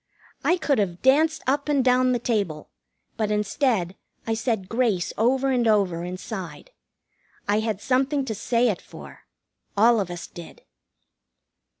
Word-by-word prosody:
I 355 - +3
could 290 -7 +1
have 180 -4 -2
danced 305 +4 +3
up 280 +3 0
and 280 -3 +2
down 255 0 +4
the 245 - +2
table, 200 -10 -2 0.5
but 215 -2 0
instead 210 -2 0 0.3
I 225 - 0
said 220 -4 -1
grace 225 -6 0
over 265 +4 +2
and 245 -3 +2
over 195 -6 +2
inside. 185 - -7 0.8
I 205 +1 +2
had 220 -3 -2
something 265 +5 +1
to 225 - -3
say 235 +3 +1
it 200 - -2
for. - - -13 0.5
All 230 +2 +5
of 190 -3 -2
us 175 0 -6
did. 170 -3 -12
225 Hz, 145 wpm, -24 LUFS, 195-260 Hz, 0.8 s, All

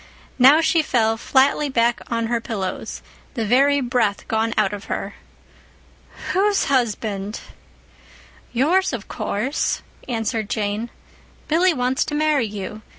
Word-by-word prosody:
Now 275 +6 +7
she 325 0 +3
fell 225 -7 +1
flatly 275 +5 +2
back 235 -2 +1
on 230 -1 -1
her 235 0 -1
pillows, 200 -6 -5 0.3
the 230 -3 -1
very 275 +5 +3
breath 240 -5 0
gone 225 +1 0
out 210 -2 +2
of 205 0 -7
her. - - -4 1.2
"Whose 400 +2 +2
husband?" 215 -5 -1 1.1
"Yours, 325 +9 +2
of 230 -5 -5
course," 250 +9 -2 0.3
answered 225 -2 -2
Jane. 210 +2 -2 0.6
"Billy 345 +4 +3
wants 255 -2 0
to 295 - -4
marry 300 -5 +2
you. 210 +1 -7
240 Hz, 125 wpm, -21 LUFS, 220-285 Hz, 1.2 s, Now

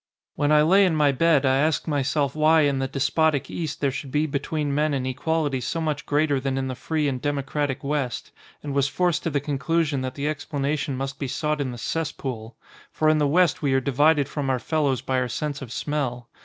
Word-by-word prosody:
When 145 0 0
I 150 0 +6
lay 190 +6 +5
in 180 -4 +2
my 150 -2 +4
bed 145 0 +3
I 130 0 +3
asked 155 +4 +1
myself 140 -1 0
why 155 +1 +4
in 140 -2 +2
the 135 - -1
despotic 145 +2 +1
East 160 -4 -4
there 140 -2 +2
should 135 +1 -6
be 150 +3 +1
between 145 0 -2
men 150 0 +1
an 130 -1 -2
equality 145 +1 -1
so 165 +7 -2
much 155 -2 -2
greater 145 -1 +2
than 135 0 -2
in 135 0 -1
the 130 - -3
free 150 +3 -1
and 130 -3 -2
democratic 145 -1 -2
West, 140 -4 -2 0.3
and 145 -1 -4
was 140 0 +2
forced 175 +4 0
to - - -2
the 145 -2 0
conclu 145 +4 0
sion 145 -3 -2
that 130 0 -4
the 140 +1 -2
explanation 145 -1 -2
must 135 0 -4
be 140 - -2
sought 150 +3 -1
in 135 - -2
the 120 - -6
cess 160 +5 -2
pool. 115 -5 -7 0.3
For 155 - +2
in 155 0 +3
the 145 - +2
West 170 +2 +3
we 140 -3 +1
are - - +4
divided 145 +2 +3
from 145 -3 -3
our 130 - +2
fellows 140 -1 0
by 130 0 0
our 125 -1 -1
sense 145 +4 -3
of 125 -4 -8
smell. 125 -4 -3
145 Hz, 230 wpm, -24 LUFS, 135-155 Hz, 0.3 s, I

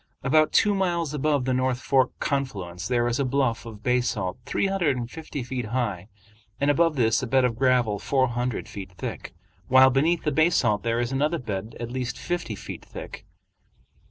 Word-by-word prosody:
About 155 +3 +3
two 205 -2 +4
miles 170 -6 0
above 145 -2 +1
the 130 - +1
North 130 0 0
Fork 130 -1 +2
confluence 95 - -3
there 120 -1 +1
is 120 +2 0
a - - +2
bluff 130 -3 0
of 110 -2 -10
basalt 120 -6 0
three - - 0
hundred 180 -9 +1
and 120 -1 -5
fifty 155 -4 -6
feet 125 -1 -4
high, 105 -5 -2 0.5
and 140 +1 +3
above 165 +1 +2
this 115 -3 +2
a 130 - -3
bed 130 +1 +3
of 120 -2 0
gravel 125 -4 +2
four 130 -1 +1
hundred 120 0 -2
feet 95 -2 -8
thick, - - -6 0.3
while 130 +1 +7
beneath 160 +6 +2
the 150 - 0
basalt 135 -11 +3
there 115 0 0
is 120 +1 -1
another 150 +5 +1
bed 110 -5 -5
at 120 0 -5
least 125 0 -3
fifty 175 -11 -3
feet - - -8
thick. - - -9
130 Hz, 185 wpm, -25 LUFS, 115-145 Hz, 0.5 s, while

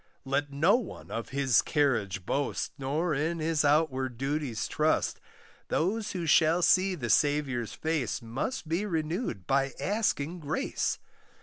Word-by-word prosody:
Let 140 +2 -1
no 160 +11 +4
one 240 -7 -8
of 115 - -4
his 135 -4 +3
carriage 110 - 0
boast 140 +5 -1
Nor 150 +5 0
in 155 +4 0
his 160 -1 +1
outward 135 -4 +1
duties 135 -3 -2
trust; - - +1 0.5
Those 210 +6 0
who 175 -3 -3
shall 160 +2 +4
see 185 +1 +4
the 120 -8 -2
Saviour's 140 -6 +1
face, 155 -7 -1
Must 130 - -4
be 165 +5 0
renewed 160 - -2
by 135 -1 +1
asking 180 -6 -1
grace. 155 0 -1
150 Hz, 135 wpm, -29 LUFS, 135-165 Hz, 0.5 s, no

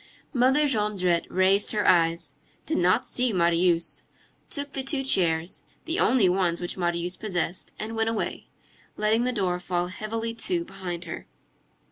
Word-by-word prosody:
Mother 265 +4 +4
Jondrette 205 -8 +1
raised 190 +2 +3
her 210 -1 +1
eyes, 165 -1 +3 0.3
did 320 - 0
not 185 +7 +3
see 250 -1 +1
Marius, 170 -2 +2 0.5
took 285 -1 -4
the 270 - 0
two 270 +1 -1
chairs, 170 -8 +1 0.2
the 330 +2 -1
only 235 -5 +4
ones 180 -2 +1
which 175 - -4
Marius 175 0 -1
possessed, 180 -3 -3
and 220 +1 -5
went 225 0 +1
away, 225 - -3 0.5
letting 220 +3 +2
the 250 - +1
door 185 -6 -1
fall 180 -1 -2
heavily 225 +4 -3
to 340 +9 -1
behind 180 - -6
her. - - -7
195 Hz, 150 wpm, -26 LUFS, 175-230 Hz, 0.5 s, Mother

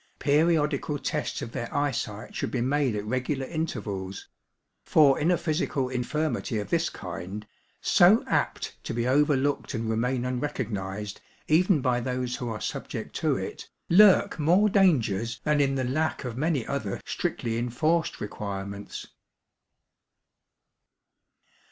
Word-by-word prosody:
Periodical 150 0 +2
tests 150 +1 -3
of 115 - -6
their 120 - -5
eyesight 120 -7 -2
should - - -2
be 125 - -2
made 130 -1 +1
at 105 0 -3
regular 130 +4 -1
intervals; 105 - -4 0.6
for 145 -4 +5
in 155 +3 +2
a 180 - +4
physical 155 -5 -1
infirmity 130 -1 -1
of 105 -2 -4
this - - +2
kind, 100 +4 -7 0.4
so 190 +6 +5
apt - - -2
to - - -4
be 120 +1 0
overlooked 145 +1 +2
and 115 0 -2
remain 120 +3 0
unrecognised 105 -6 -3 0.3
even 170 0 +4
by 125 -1 +1
those 125 0 -2
who 120 - -4
are 110 -2 -4
subject - - -5
to - - +1
it, - - -6 0.2
lurk 190 -1 +6
more 180 +8 +4
dangers 115 - +2
than 150 -1 +2
in 135 -1 +2
the 130 - 0
lack 150 +6 -1
of 120 -2 -4
many 145 -2 0
other 115 -9 -3
strictly 115 -1 -2
enforced 155 +8 0
requirements. 100 -1 -6
130 Hz, 135 wpm, -27 LUFS, 115-150 Hz, 0.6 s, lurk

